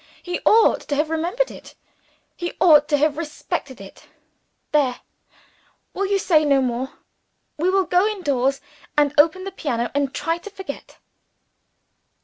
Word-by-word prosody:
He 355 -1 -3
ought 445 +1 +5
to 285 - -1
have 305 +2 0
remembered 350 +10 -1
it, - - -13 0.6
he 345 -1 -5
ought 300 -4 +6
to 290 - +2
have 300 +1 +1
respected 295 -4 -5
it. 195 0 -13 0.6
There! 275 -5 +1 0.9
we 395 +1 -1
will 400 - +2
say 335 -6 +3
no 280 -2 +3
more. 255 0 -2 0.6
We 340 +4 +1
will 380 0 +2
go 360 +4 +3
indoors 275 - -1 0.4
and 290 -1 +3
open 330 +5 +4
the 390 - -5
piano 240 -10 -3
and 280 -1 0
try 330 +3 -2
to 415 - -10
forget." 385 -7 -9
310 Hz, 145 wpm, -22 LUFS, 280-370 Hz, 0.9 s, ought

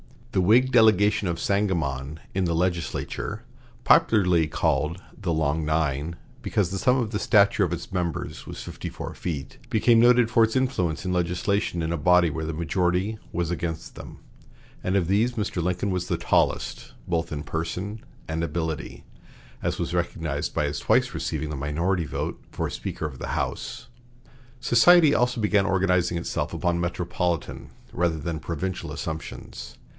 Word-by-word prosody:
The 95 - +2
Whig 120 +8 +4
delegation 105 -4 +4
of 85 -1 -2
Sangamon 80 -8 -1
in 95 -1 +1
the 85 -1 0
legislature, 85 0 -2 0.4
popularly 90 -7 +4
called 75 +2 0 0.2
the 90 -5 -2
"Long 80 0 0
Nine," 75 0 0 0.3
because 95 -4 0
the 95 - -2
sum 125 +6 +3
of 115 -4 -1
the 105 - -1
stature 100 -1 +4
of 85 - -3
its 85 - -6
members 90 -4 -3
was - - -7
fifty - - -7
four - - -6
feet, 75 -6 -5
became 115 +1 +4
noted 120 -1 +5
for 115 -2 +5
its 110 - -4
influence 95 - 0
in 90 - -1
legislation 90 +1 0
in 80 - -1
a 85 - 0
body 90 +2 +4
where 80 +1 -4
the 80 - -3
majority 90 +6 0
was 85 -1 -1
against 80 -2 -4
them; - - -10 0.6
and 90 - 0
of 90 -4 +2
these 110 +6 +2
Mr. 105 -5 -2
Lincoln 90 +3 -1
was 90 -1 -2
the - - 0
"tallest" - - 0
both 85 -1 -1
in 75 -1 -4
person 90 +8 -4 0.3
and 80 +1 -1
ability, 80 -1 -3 0.6
as - - -1
was - - -3
recognized 80 -4 -2
by 75 - +1
his 75 0 -2
twice - - +2
receiving 80 - -3
the 75 - -4
minority 85 +5 0
vote 70 - -4
for - - -2
Speaker - - -5
of 70 -4 -6
the - - -3
House. - - -4 0.7
Society 155 +5 +6
also 125 -1 +1
began 105 -2 +3
organizing 90 -3 +2
itself 85 - -3
upon 85 0 0
metropolitan 85 -1 -2 0.2
rather 85 -1 0
than 80 +1 -4
provincial 85 +4 -4
assumptions. 80 -6 -7
90 Hz, 160 wpm, -25 LUFS, 80-100 Hz, 0.7 s, Society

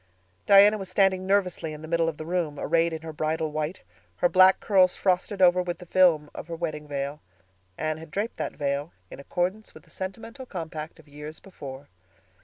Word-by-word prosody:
Diana 205 +2 +7
was 190 -2 -6
standing 190 0 +2
nervously 185 -5 0
in 150 +1 -10
the - - -7
middle 165 0 +1
of 155 - -7
the 155 - -7
room, 165 -4 -2
arrayed 165 0 +2
in 160 0 -6
her 160 -1 -7
bridal 155 0 -1
white, 155 +4 -3 0.3
her 175 - +3
black 185 +1 +6
curls 185 -3 +4
frosted 190 +1 +1
over 180 0 +6
with 175 -1 -3
the 180 - -12
film 170 -5 +3
of - - -8
her 170 - -5
wedding 155 -3 -4
veil. 140 +1 -4 0.6
Anne 155 0 -2
had 160 0 -11
draped 205 +8 -3
that - - -3
veil, 145 +2 -2 0.2
in - - -9
accordance 180 +9 -3
with - - -13
the - - -21
sentimental 225 +7 -7
compact 160 -5 -6
of - - -18
years 150 +2 -9
before. 140 -7 -10
170 Hz, 200 wpm, -26 LUFS, 155-185 Hz, 0.6 s, Diana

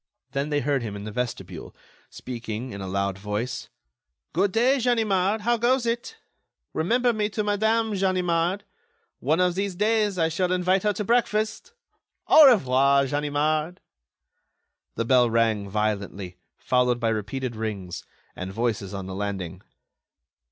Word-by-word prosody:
Then 140 +2 -2
they 145 -1 +1
heard 140 0 0
him 110 -3 -5
in 100 - -7
the 105 - -6
vestibule, 100 -7 -5 0.3
speaking, 120 0 -6
in 100 - -7
a 95 - -5
loud 100 0 -2
voice: 105 +6 -4 0.6
"Good 190 +4 +2
day, 250 +6 +3
Ganimard, 220 -4 +1
how 240 +2 +2
goes 240 +2 +2
it? 235 - -3 0.6
Remember 240 +9 +2
me 210 -1 0
to 215 0 -2
Madame 220 +2 +1
Ganimard. 185 -1 0 0.6
One 155 +6 +1
of 180 -1 +3
these 195 0 -2
days, 210 0 +1
I 165 -2 +2
shall 180 +3 -1
invite 185 +1 +2
her 210 +1 +1
to 210 - -3
breakfast. 220 - 0 0.5
Au 310 -2 +9
revoir, 140 - +4
Ganimard." 150 +4 -1 1.2
The 115 - -1
bell 125 -1 +4
rang 110 -3 +1
violently, 100 -3 -3 0.2
followed 125 -1 +1
by 115 -1 +1
repeated 115 +3 -3
rings, 105 -5 -5 0.3
and 95 +1 -5
voices 105 -2 -2
on 95 -1 -5
the 95 - -6
landing. 95 -3 -4
145 Hz, 145 wpm, -25 LUFS, -, 1.2 s, Au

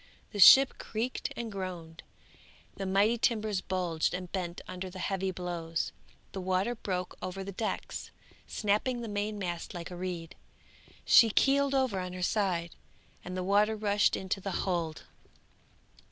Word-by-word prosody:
The 205 - -6
ship 265 +7 +9
creaked 230 +3 -3
and 235 -2 -4
groaned; 175 -4 -6 0.7
the 195 - -5
mighty 205 +5 +3
timbers 215 -4 +1
bulged 180 -3 -1
and 180 -1 -6
bent 180 -3 -3
under 185 +1 -5
the 185 - -10
heavy 190 0 -1
blows; 175 -3 -3 0.4
the 190 - -5
water 190 +5 0
broke 185 -6 -4
over 185 +1 -4
the 200 - -6
decks, 215 +3 -4 0.4
snapping 220 +4 0
the 230 - -5
main 210 0 -2
mast 175 -1 -4
like 170 +1 -6
a - - -6
reed; 175 -2 -5 0.7
she 230 -3 +7
heeled 275 0 +3
over 260 -8 +1
on 180 0 -5
her 180 0 -4
side, 175 -4 0 0.5
and 180 +1 -6
the 185 - -2
water 205 +3 +3
rushed 210 -1 +2
into 190 +1 -3
the 195 - -4 0.2
hold. 170 -4 -2
190 Hz, 155 wpm, -30 LUFS, 180-210 Hz, 0.7 s, ship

